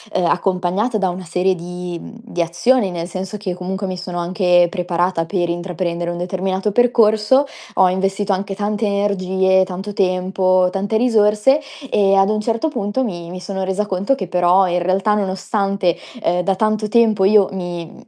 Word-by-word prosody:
uhm, 180 - +2
accompagnata 185 +6 0
da 190 -3 0
una 180 +1 -6
serie 180 +3 0
di 180 0 -6
mhmm, - - -11
di 180 -7 -3
azioni, 195 +6 +1
nel 170 -1 -4
senso 190 +3 -5
che 195 -3 -4
comunque 190 +2 -4
mi 185 -1 -3
sono 180 -1 -6
anche 175 0 +3
preparata 175 -1 -1
per 175 -1 -1
intraprendere 175 0 -3
un 175 - -4
determinato 190 +3 -2
percorso, 235 +3 +3 0.3
ho 185 -1 +5
investito 195 +2 -1
anche 195 +1 -3
tante 210 +2 -1
energie, 190 -2 +1
tanto 190 +3 -6
tempo, 185 -1 +1
tante 200 +3 -1
risorse 220 +3 +3 0.3
e 195 -1 +3
ad 195 +1 +4
un 215 - 0
certo 230 +7 -1
punto 240 -2 -2
mi 175 -7 -5
mi 185 - -7
sono 190 +1 -4
resa 190 +2 -1
conto 200 +6 0
che 190 - -5
però, 180 +2 +3
in 175 0 0
realtà, 190 +4 +1
nonostante, 195 -2 -1 0.3
ehm, 175 +1 +1
da 195 +2 0
tanto 215 +1 0
tempo 215 -3 +3
io 200 0 +5
mi 175 -3 -6
190 Hz, 175 wpm, -19 LUFS, 180-205 Hz, 0.3 s, ho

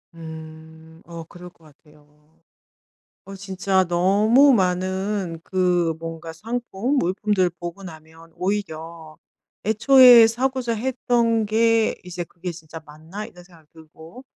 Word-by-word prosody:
음 160 0 -12
어 170 -1 -9
그럴 175 +2 -13
것 165 - -29
같아요. 150 +1 -24 0.9
어 195 - -10
진짜 190 0 -1
너무 210 +10 +4
많은 185 -2 -1
그 180 -3 0
뭔가 165 0 -8
상품 235 - -3
물품들을 190 -3 0
보고 175 +3 -8
나면 160 -1 -13
오히려 165 -5 -5 0.5
애초에 240 +1 +7
사고자 250 0 -2
했던 235 -2 0
게 225 +1 +2
이제 180 -1 -6
'그게 175 +1 -8
진짜 160 -1 -11
맞나?' 160 +8 -9
이런 180 -5 -15
생각이 170 -4 -21
들고 160 +9 -15
180 Hz, 230 characters per minute, -22 LUFS, 160-215 Hz, 0.9 s, 애초에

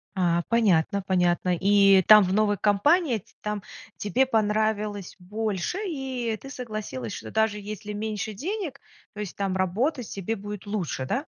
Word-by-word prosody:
А, 175 -2 +2
понятно, 200 -4 +3
понятно. 180 -1 +2
И 195 0 +5
там, 210 -1 +9
в 185 +1 -1
новой 205 -1 +2
компании, 245 - +3
ть - - -25
там 210 -1 -3 0.4
тебе 245 +6 +1
понравилось 215 -3 0
больше 210 - -3
и 260 - -3
ты 270 - -9
согласилась, 215 - -5
что 110 0 -7
даже 220 -1 +1
если 210 0 -7
меньше 215 0 -3
денег, 325 - -4 0.3
то 210 - -10
есть 205 -4 -5
там 195 -2 -1
работать 225 - 0
тебе 200 +3 -3
будет 205 0 -7
лучше, 185 -10 -3
да? 275 - -2
210 Hz, 155 wpm, -26 LUFS, 190-225 Hz, 0.4 s, там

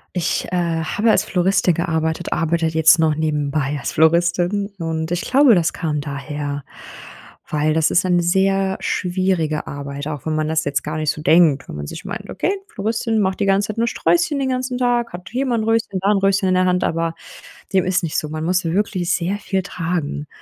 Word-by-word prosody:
Ich, 175 -2 0
äh, - - -1 0.3
habe 210 +7 0
als - - +4
Floristin 185 0 +2
gearbeitet, 160 -1 -2
arbeite 165 0 0
jetzt 160 +1 +5
noch 155 -2 +3
nebenbei 150 -2 -1
als - - -4
Floristin. 175 +5 +2
Und 160 -1 -3
ich 175 0 -1
glaube, 265 -3 +5
das 170 -2 +1
kam 150 -4 -2
daher, 145 0 -5 0.9
weil 155 0 +1
das 160 -1 +2
ist 185 - +2
eine 175 -1 +2
sehr 190 +2 +1
schwierige 180 -4 -1
Arbeit, 140 0 -6
auch 150 -2 -6
wenn 155 - 0
man 155 0 0
das 160 0 0
jetzt 140 -1 -1
gar 155 +1 -4
nicht 155 -1 -1
so 150 - -2
denkt, 160 -6 +4
wenn - - -8
man 75 0 -6
sich - - -8
meint: - - -6
„Okay, 380 - -1 0.2
Floristin 225 - -1
macht 190 -1 -1
die 200 - +1
ganze 195 +1 +2
Zeit 215 - -4
nur 235 - +2
Sträußchen 335 +2 +1
den 270 -1 -1
ganzen 255 0 -2
Tag, 240 -3 0
hat 175 -1 -8
hier 260 +2 -1
mal 240 -2 +1
‘n 220 - -1
Röschen, 225 -3 0
da 195 +2 +2
‘n 210 - +3
Röschen 195 0 +2
in 185 - +2
der 185 0 +3
Hand“, 180 0 +1
aber 165 0 -1 0.6
dem 190 - +4
ist 185 0 0
nicht 160 - -2
so. 150 - -6
Man 155 0 -4
muss 180 +1 +1
wirklich 185 0 0
sehr 185 +3 -2
viel 190 -2 -2
tragen. 165 -5 -3
175 Hz, 210 wpm, -20 LUFS, 155-195 Hz, 0.9 s, jetzt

